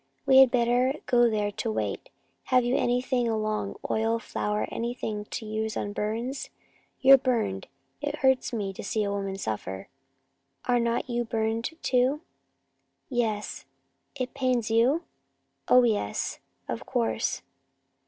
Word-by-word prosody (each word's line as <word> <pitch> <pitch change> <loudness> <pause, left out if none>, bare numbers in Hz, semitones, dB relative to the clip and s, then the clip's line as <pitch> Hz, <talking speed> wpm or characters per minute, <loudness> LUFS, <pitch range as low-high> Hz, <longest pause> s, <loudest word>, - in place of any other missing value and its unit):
"We 265 -1 +7
had 265 -1 +8
better 245 +2 +2
go 240 -1 +4
there 210 -2 0
to 220 +2 -3
wait. - - -3 0.4
Have 255 -2 +3
you 245 +2 +1
anything 245 0 +1
along 215 -2 -1
oil, 225 +1 +1
flour, 210 -2 -2
anything 230 -3 -3
to 225 - -6
use 220 0 -2
on 205 - -3
burns? 230 +7 -3 0.5
You're 270 0 +8
burned. 230 - -1 0.3
It - - -2
hurts 265 -1 +2
me 205 -5 -3
to - - -8
see 210 +2 -1
a 200 - -1
woman 195 -1 -3
suffer." 100 - -4 0.8
"Are 245 -1 +3
not 235 +1 0
you 240 -1 -1
burned 225 0 -1
too?" 260 +4 +2 0.9
"Yes." 225 -5 -2 0.5
"It 255 -2 -3
pains 255 -4 0
you?" 250 +9 +3 0.6
"Oh, 250 0 +7
yes, 220 -4 -1 0.3
of - - -4
course." 245 -3 -1
235 Hz, 135 wpm, -27 LUFS, 215-250 Hz, 0.9 s, had